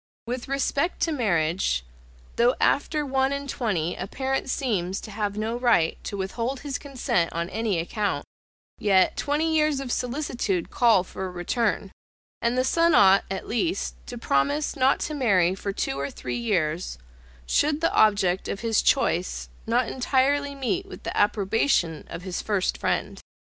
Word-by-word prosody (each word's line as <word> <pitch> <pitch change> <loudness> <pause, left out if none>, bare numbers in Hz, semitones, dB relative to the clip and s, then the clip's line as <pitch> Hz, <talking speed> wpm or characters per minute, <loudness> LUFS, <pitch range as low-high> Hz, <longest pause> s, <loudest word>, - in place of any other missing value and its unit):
With 245 +1 -4
respect 275 +4 0
to 330 - +2
marriage, 170 - 0 0.5
though 240 +2 +3
after 300 +1 +1
one 265 0 +1
and 280 0 -3
twenty 195 - -1
a 185 - -5
parent 265 +3 -2
seems 195 -9 -1
to 215 - -9
have 205 0 -3
no 220 +2 -1
right 240 -10 +2
to 200 - -4
withhold 230 +7 -3
his 280 -3 -4
consent 255 - -1
on 170 +1 -3
any 220 -2 0
account; 205 +5 -2 0.5
yet 190 -3 +3
twenty 315 +3 0
years 305 -2 +2
of 270 -3 -4
solicitude 245 - -2
call 230 -7 +4
for 190 +1 -6
a - - -6
return, 195 +3 -1 0.5
and 235 +1 +1
the 255 - +3
son 335 +4 +3
ought, 195 0 +6
at 190 0 -4
least, 330 - -1
to 245 - -6
promise 235 - 0
not 270 -1 +3
to 305 - -2
marry 195 - +3
for 200 +1 -4
two 135 -7 -2
or 140 0 -2
three 125 - -5
years, 175 - -1 0.5
should 295 - +2
the 330 - +1
object 200 -4 +3
of 195 - -4
his 225 -2 +2
choice 185 -10 +1 0.2
not 235 +1 +2
entirely 280 +2 +1
meet 250 -9 -2
with - - -11
the - - -4
approbation 200 - +1
of 175 - -7
his 185 -2 -3
first 205 -4 0
friend. - - -1
225 Hz, 165 wpm, -25 LUFS, 190-270 Hz, 0.5 s, ought